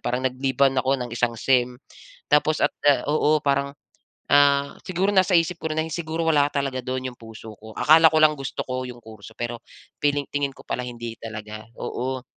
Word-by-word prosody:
parang 125 +2 -2
nagliban 130 +1 +1
ako 130 - -1
ng 120 - -9
isang 120 -1 -1
sem. 125 0 +1 0.6
Tapos 150 0 +3
at, - - +2 0.2
ah, 135 -4 +4
oo 150 0 +1
parang, 140 0 0 0.6
ah, 140 0 +4
siguro 185 +2 -1
nasa 185 -2 +4
isip 165 +1 -1
ko 160 - -3
rin 155 - -3
na 160 - +1
yun 160 - -7
siguro 165 -1 -3
wala 145 -3 +3
talaga 135 -3 -2
do'n 130 0 -4
yung - - -26
puso 110 -1 -11
ko. 110 0 -12
Akala 160 +1 +6
ko 160 - 0
lang 155 0 +5
gusto 135 -2 -5
ko 130 0 -4
yung 120 - -9
kurso 110 0 -13
pero 120 -1 -4 0.4
feeling 145 -1 +1
tingin 140 -1 -1
ko - - -16
pala 125 - -3
hindi 120 -2 -6
talaga. 110 -1 -7 0.2
Oo. 130 +1 -4
135 Hz, 200 wpm, -23 LUFS, 125-150 Hz, 0.6 s, Akala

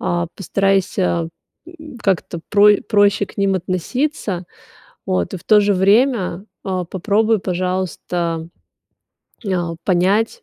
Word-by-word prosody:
а, 175 -2 -1
постарайся, 195 -3 0 0.4
м, 310 -7 -12
как-то 185 -4 -1
про 205 0 +6
проще 205 -1 +3
к - - -17
ним 195 -1 +1
относиться, 185 - -2 0.6
вот, 90 -2 -1
и - - -3
в - - -16
то 215 -1 +5
же 205 0 +2
время, 200 -1 +2 0.2
а, 185 -2 -2
попробуй, 215 +4 +1
пожалуйста, 180 -2 -2 1.0
м, 195 - -2
а, 170 -2 -2
понять, 200 - +1
190 Hz, 120 wpm, -19 LUFS, 180-210 Hz, 1.0 s, про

